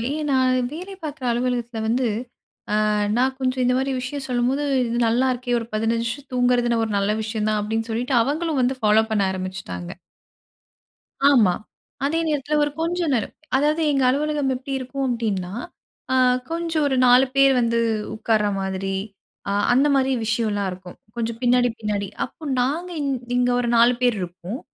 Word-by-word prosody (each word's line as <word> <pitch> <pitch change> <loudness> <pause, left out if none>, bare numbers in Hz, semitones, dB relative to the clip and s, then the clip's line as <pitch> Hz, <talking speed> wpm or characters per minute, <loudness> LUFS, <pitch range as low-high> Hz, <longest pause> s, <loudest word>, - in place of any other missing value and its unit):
எ - - -3
நான் 260 -1 +3
வேலை 365 +6 -7
பார்க்குற 290 -3 -5
அலுவலகத்தில 240 -1 -1
வந்து 240 +3 +1 0.8
ஆ - - +2 0.3
நான் 260 +2 +1
கொஞ்சம் 255 -1 0
இந்த 250 0 +3
மாரி 265 +1 0
விஷயம் 270 +2 -5
சொல்லும்போது. 250 +3 0 0.2
இது 235 0 -1
நல்லாருக்கே 245 +1 +1
ஒரு 230 - -7
15 225 +2 0
நிமிஷம் 275 +4 -6
தூங்குறது 245 -1 +2
ஒரு 220 - -4
நல்ல 200 +1 +1
விஷயம் 215 0 -2
தான். 215 0 +1
அப்டின்னு 225 +2 -2
சொல்லிட்டு 245 +4 -1
அவங்களும் 300 +2 0
வந்து 255 +1 +1
ஃபாலோ 215 0 +4
பண்ண 210 -2 +2
ஆரம்பிச்சுட்டாங்க. 185 - -5 1.4
ஆமா, 230 -10 +5 0.5
அதே 320 +4 +1
நேரத்தில 300 0 0
ஒரு 295 - -1
கொஞ்சம் 340 -1 0
நேரம். 230 -5 -1 0.2
அதாவது 300 +4 +2
எங்க 275 -2 +1
அலுவலகம் 290 0 0
எப்டி 260 +2 -7
இருக்கும் 270 +2 -4
அப்டின்னா, 210 -7 -2 0.6
ஆ - - +3 0.4
கொஞ்சம் 330 -2 -1
ஒரு 270 - 0
4 250 +2 +6
பேர் 275 0 +6
வந்து 235 -1 +1 0.4
உட்கார 220 -1 +1 0.2
மாதிரி, 190 0 -2 0.5
அ - - 0 0.2
அந்த 270 +4 +4
மாரி 265 0 +2
விஷயம்லாம் 215 -3 0
இருக்கும். 180 0 -10 0.2
கொஞ்சம் 230 -1 -3
பின்னாடி, 245 0 +4
பின்னாடி 205 -2 -2 0.2
அப்போ 320 - -16 0.2
நாங்க 310 +8 -1
இங் 280 -1 0 0.3
இங்க 245 0 +2
ஒரு 240 -1 0
4 235 +2 +6
பேர் 245 -3 +2
இருப்போம். 180 +6 -6
245 Hz, 160 wpm, -22 LUFS, 220-275 Hz, 1.4 s, 4